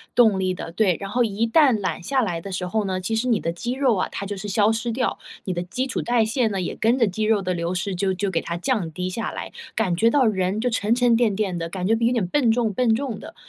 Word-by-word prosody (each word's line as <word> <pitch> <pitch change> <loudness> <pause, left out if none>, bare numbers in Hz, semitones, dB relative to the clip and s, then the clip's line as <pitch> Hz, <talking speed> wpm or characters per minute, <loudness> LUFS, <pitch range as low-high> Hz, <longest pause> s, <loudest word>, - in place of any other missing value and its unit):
动 220 -6 +5
力 185 -1 0
的， 165 - -7
对， 185 -1 +2
然 195 -1 -6
后 245 +3 +2
一 220 +1 0
旦 290 +3 +5
懒 185 - -2
下 270 +3 +1
来 175 -8 -1
的 195 +2 -7
时 180 0 -3
候 215 +2 -1
呢， 185 -1 -2
其 225 +4 -2
实 235 +3 0
你 230 -4 +2
的 165 - -2
肌 235 +8 -4
肉 260 -4 +2
啊， 185 - 0
它 200 - -5
就 205 +1 -4
是 205 - -6
消 205 +1 +3
失 230 +1 -2
掉， 250 +2 -1 0.3
你 185 - -1
的 175 - -2
基 255 +9 -3
础 260 - -2
代 240 -2 +2
谢 230 +2 +1
呢 195 -3 -2
也 180 - -3
跟 230 +3 +2
着 230 - +4
肌 210 +3 -2
肉 215 -1 +2
的 185 -1 -1
流 170 +1 -2
失， 185 +1 -2
就 190 +1 0
就 190 +1 -2
给 165 -3 0
它 170 - -4
降 180 -3 -1
低 180 +3 -3
下 225 +5 -3
来， - - -6 0.2
感 190 -6 +1
觉 230 +6 +3
到 270 0 +3
人 195 -1 0
就 250 - +1
沉 225 -1 +1
沉 245 -1 +3
淀 225 -4 +2
淀 195 -4 -1
的， 165 0 -4
感 185 +1 -3
觉 225 - +3
有 235 +1 +2
点 230 -7 0
笨 235 +3 +2
重 225 -3 +1
笨 235 +1 +2
重 245 -3 -2
的， - - -10
210 Hz, 310 characters per minute, -23 LUFS, 185-235 Hz, 0.3 s, 动